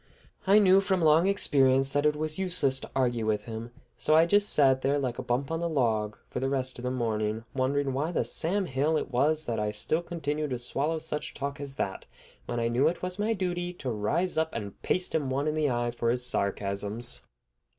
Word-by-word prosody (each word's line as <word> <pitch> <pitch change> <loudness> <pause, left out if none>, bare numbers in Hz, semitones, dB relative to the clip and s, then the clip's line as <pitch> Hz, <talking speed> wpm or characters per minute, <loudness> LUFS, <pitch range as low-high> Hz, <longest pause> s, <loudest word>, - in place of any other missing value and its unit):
I 200 +2 +6
knew 195 -2 +6
from 190 -3 0
long 160 +3 +5
experience 135 -8 +3
that 145 +1 +3
it 150 - +1
was 155 +2 -2
useless 170 -8 +1
to - - -9
argue 120 -4 0
with 105 -1 0
him, 115 +1 -6 0.3
so 155 - +3
I 160 +1 +6
just 205 +4 +3
sat 135 -2 +4
there 140 +2 +1
like 130 -4 -2
a - - -1
bump 130 +3 -2
on 165 +1 -2
a 170 - 0
log 110 -8 0
for - - -4
the 135 +1 -1
rest 130 -2 -2
of - - -8
the 125 - -1
morning, 110 -3 -1
wondering 135 +1 0
why 150 +6 -1
the - - 0
Sam 190 +5 -1
Hill 150 +2 +1
it 145 - -4
was 150 +5 +2
that 115 -2 -2
I 105 0 0
still 105 +10 0
continued 155 -3 -3
to 125 - -2
swallow 140 +6 -2
such 155 -1 -5
talk 140 0 -4
as 140 -1 -5
that, 95 -9 -4 0.4
when 120 - -2
I 115 - +1
knew 120 +4 +2
it 175 - -2
was 180 +2 -4
my 215 +2 +1
duty 175 -3 -2
to 135 -7 -4
rise 160 - 0
up 160 0 +1
and 105 -3 -6
paste 180 0 0
him 150 -4 0
one 140 +3 -1
in 155 - +1
the 155 -2 +1
eye 120 -1 0
for 120 0 -1
his 125 +1 +1
sarcasms. 100 +1 -3
140 Hz, 225 wpm, -28 LUFS, 120-160 Hz, 0.4 s, I